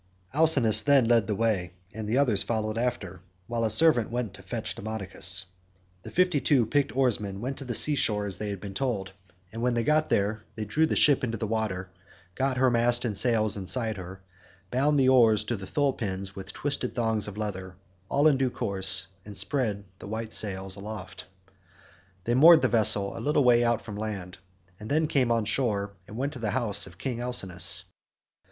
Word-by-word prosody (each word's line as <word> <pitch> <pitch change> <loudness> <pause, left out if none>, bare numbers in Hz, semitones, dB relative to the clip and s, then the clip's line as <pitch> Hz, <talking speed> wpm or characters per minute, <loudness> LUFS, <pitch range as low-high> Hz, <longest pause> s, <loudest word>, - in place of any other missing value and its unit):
Alcinous 140 -8 +4
then 140 -4 +4
led 115 -4 +3
the 105 - -1
way, 100 -5 -1 0.2
and 110 0 -6
the 120 - +1
others 120 -8 +2
followed 110 -2 -2
after, 120 -6 -3 0.2
while 115 +3 -3
a 110 - +1
servant 120 -1 +3
went 120 -4 -3
to 100 - -12
fetch 110 +4 -4
Demodocus. 95 -3 -1 0.6
The - - -10
fifty 180 -5 +1
two 135 -6 +3
picked 140 +2 -1
oarsmen 105 -7 0
went 130 +5 -4
to 135 - -9
the 120 -2 -2
sea 150 - +3
shore 105 -7 0
as 100 -2 -2
they 105 - -4
had 100 -2 -5
been 100 -1 -8
told, 100 -4 -2 0.4
and 115 +1 -7
when 125 0 +1
they 120 - 0
got 155 +4 +1
there 105 +2 0
they 110 - -4
drew 155 +10 +1
the - - -1
ship 145 -3 +4
into 115 -2 -2
the 110 - -3
water, 100 -4 -3 0.4
got 130 +4 -1
her 130 -1 +3
mast 120 +1 +2
and 110 -4 -2
sails 110 -1 +2
inside 110 +2 0
her, 95 +1 -9 0.5
bound 140 +3 +2
the 130 - +3
oars 115 -5 +5
to 120 - -3
the 95 -3 -8
thole 140 +4 0
pins 95 -3 -5
with 95 -1 -8
twisted 145 0 -3
thongs 110 -4 0
of 105 0 -8
leather, 95 -4 -5 0.3
all 145 +2 +3
in 145 -3 +4
due 130 -1 +1
course, 95 -5 +2 0.2
and 105 0 -7
spread 110 -8 0 0.2
the - - -10
white 110 +1 -5
sails 95 -1 -1
aloft. 100 -2 -8 1.0
They 120 - -1
moored 160 +6 +7
the - - +4
vessel 100 -3 +3
a - - -6
little 145 0 +2
way 120 -1 +4
out 115 -1 0
from 105 -3 -8
land, 100 -4 -6 0.4
and 105 - -9
then 155 +2 +2
came 130 -5 +1
on 115 -2 +1
shore 105 -3 -1 0.2
and 110 - -10
went 140 +3 -2
to 125 - -9
the 110 -3 -2
house 105 -4 +1
of 90 -1 -15
King 120 +3 -4
Alcinous. 95 -7 0
110 Hz, 200 wpm, -27 LUFS, 100-125 Hz, 1.0 s, moored